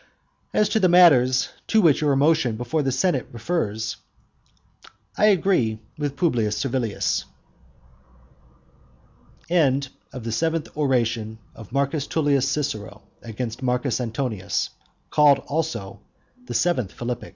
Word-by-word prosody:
As 210 - +3
to 220 - +1
the 185 -3 +3
matters 130 -8 +5 0.2
to 220 - +3
which 160 -6 +4
your 145 -2 +2
motion 140 -4 +2
before 125 +7 -1
the 135 -2 0
senate 135 0 0
refers, 110 -4 -2 1.2
I 210 - +4
agree 180 - +2 0.2
with 145 -2 -3
Publius 115 - +1
Servilius. 115 - -1 2.2
THE 175 +2 +1
EIGHTH 135 +1 -1
ORATION 115 -6 0 0.2
OF 110 - -12
M 140 0 +2
T 145 -1 0
CICERO 130 -7 -3 0.2
AGAINST 115 +1 -6
MARCUS 125 0 0
ANTONIUS 115 -5 -2 0.4
CALLED 145 -2 +5
ALSO 120 -11 -3 0.5
THE - - -5
EIGHTH 130 - +1
PHILIPPIC 120 0 -5
135 Hz, 110 wpm, -23 LUFS, 115-155 Hz, 2.2 s, matters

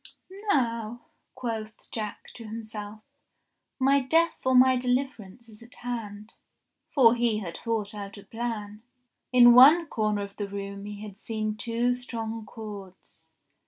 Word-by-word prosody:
"Now," 235 - 0 0.3
quoth 225 -4 -6
Jack 215 -2 -5
to 235 - -10
himself, 215 -1 -8 0.7
"my 275 +1 +4
death 325 +6 +2
or 260 0 +2
my 255 +1 +7
de 250 0 -2
liverance 245 -4 -2
is 215 -1 -15
at 235 +1 -12
hand." 220 -3 -6 0.6
For 240 -5 +5
he 235 -2 +1
had 180 -6 -5
thought 220 -2 -3
out 200 -1 -7
a 200 - -11
plan. 220 -3 -5 0.5
In 240 -1 +8
one 295 +8 +8
corner 215 -7 -1
of 200 0 -10
the 205 - -3
room 200 0 -6
he 205 0 -7
had 205 -1 -10
seen 215 -2 -3
two 235 +2 0
strong 225 -3 -5
cords. 205 -4 -11
225 Hz, 145 wpm, -27 LUFS, 210-245 Hz, 0.7 s, In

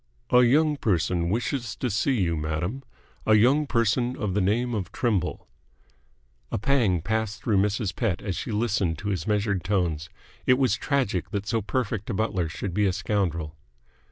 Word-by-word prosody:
"A 125 - +7
young 150 +5 +4
person 90 - 0
wishes 120 +2 -2
to 130 - -2
see 120 +4 +1
you, 85 -2 +1
madam. 80 - -2 0.5
A 110 - +6
young 135 +7 +4
person 120 +1 +1
of 105 -5 -2
the 105 - +1
name 120 +6 +1
of 100 -5 -3
Trimble." 100 -8 -1 1.0
A - - 0
pang 110 - +2
passed 110 -1 -2
through 110 -4 +2
Mrs. 105 0 -1
Pett 105 -8 0
as 100 -3 -3
she 115 - -4
listened 105 -6 0
to 100 +5 -4
his 90 -6 -2
measured 105 -3 0
tones. 85 -5 -1 0.4
It 125 - +5
was 130 -2 +2
tragic 110 - -1
that 100 -1 -3
so 115 +1 0
perfect 110 -1 -2
a 110 - -1
butler 95 -6 0
should 90 +2 -5
be 105 +2 +2
a 95 - +1
scoundrel. 90 -5 -1
105 Hz, 175 wpm, -26 LUFS, 90-120 Hz, 1.0 s, A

